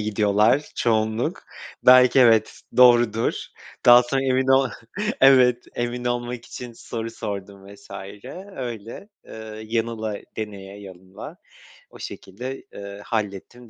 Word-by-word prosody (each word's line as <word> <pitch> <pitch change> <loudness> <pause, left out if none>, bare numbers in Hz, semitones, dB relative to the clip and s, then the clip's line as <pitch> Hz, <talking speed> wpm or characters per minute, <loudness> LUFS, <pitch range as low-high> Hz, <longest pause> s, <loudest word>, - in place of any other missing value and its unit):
gidiyorlar? 105 +5 +1
Çoğunluk 110 0 0 0.4
belki, 125 +1 +6
evet, 115 -3 +3 0.2
doğrudur," 120 -3 +4 0.5
daha 120 0 +9
sonra 135 +2 -1
emin 130 0 +1
ol 135 0 +4 0.5
Evet, 125 -2 +5
emin 120 +1 -3
olmak 120 0 -3
için 125 -1 -9
soru 115 0 -6
sordum 100 -3 -7
vs. - - -19 0.7
öyle, 120 - -7 0.2
ııı, 110 0 -9
yanıla 110 -1 -2 0.2
deneye 100 -2 -7
yanıla 95 -1 -11 0.5
o - - -15
şekilde, 125 +8 -8
ııı, 100 0 -9
hallettim 110 +2 -5
115 Hz, 110 wpm, -23 LUFS, 105-125 Hz, 0.7 s, daha